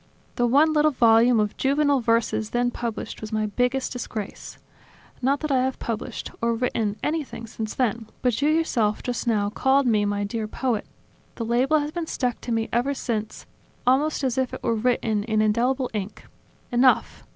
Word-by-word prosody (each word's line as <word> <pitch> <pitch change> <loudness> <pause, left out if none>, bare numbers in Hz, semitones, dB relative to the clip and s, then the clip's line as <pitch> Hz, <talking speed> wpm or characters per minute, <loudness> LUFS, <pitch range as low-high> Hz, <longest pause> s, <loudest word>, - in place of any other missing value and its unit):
The 245 - +2
one 295 +6 +4
little 305 0 +4
volume 235 -2 +4
of 210 -1 0
juvenile 285 +1 +2
verses 230 -2 +1
then 245 +1 0
published 230 -2 -5
was 215 0 -6
my 215 0 0
biggest 250 +6 -1
disgrace. 220 -4 -6 0.6
Not 275 +3 +1
that 305 -2 -2
I 260 -2 +3
have 260 0 -1
published, 230 +1 -5
or 235 0 +1
written 225 -3 -1
anything, 300 -7 -3
since 220 -1 -6
then; 230 -3 -1 0.2
but 250 0 +1
you 295 - +3
yourself, 255 -10 +1
just 245 0 -3
now, 205 -3 +1
called 270 +4 +2
me 215 -4 +3
'my 205 0 -1
dear 215 +1 -3
poet'! 230 -1 -2 0.5
The 230 - -4
label 250 +7 +2
has 295 +1 -4
been 335 0 -4
stuck 250 -5 -2
to 240 - -5
me 225 -1 0
ever 255 +4 +1
since, 220 -5 -4 0.4
almost 280 +4 +2
as 260 -1 0
if 260 -1 -1
it - - -10
were - - +1
written 225 -2 0
in 220 -2 0
indelible 245 +5 +1
ink. 205 -1 -5 0.5
Enough. 245 +1 +3
240 Hz, 180 wpm, -24 LUFS, 220-265 Hz, 0.6 s, one